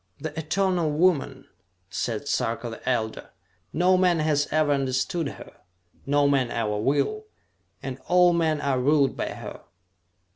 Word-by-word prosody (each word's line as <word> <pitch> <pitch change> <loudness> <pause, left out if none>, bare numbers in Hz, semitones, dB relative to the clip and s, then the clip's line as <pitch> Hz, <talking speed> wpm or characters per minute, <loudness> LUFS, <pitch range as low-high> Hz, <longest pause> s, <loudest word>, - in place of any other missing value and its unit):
"The 155 -1 -6
eternal 175 +1 0
woman!" 150 -4 +1 0.5
said 115 +6 -3
Sarka 115 -2 -1
the 115 - -5
Elder. 110 -3 -2 0.4
"No 185 +2 +3
man 180 -2 +3
has 155 -2 +1
ever 155 -1 +2
understood 135 +4 0
her - - -12 0.5
no 145 0 +3
man 135 -3 +2
ever 105 -3 -1
will! 145 - 0 0.6
And 130 -1 -5
all 180 -1 +5
men 160 -3 +1
are 140 -3 0
ruled 140 0 +3
by - - -3
her!" - - -8
145 Hz, 140 wpm, -25 LUFS, 130-170 Hz, 0.6 s, all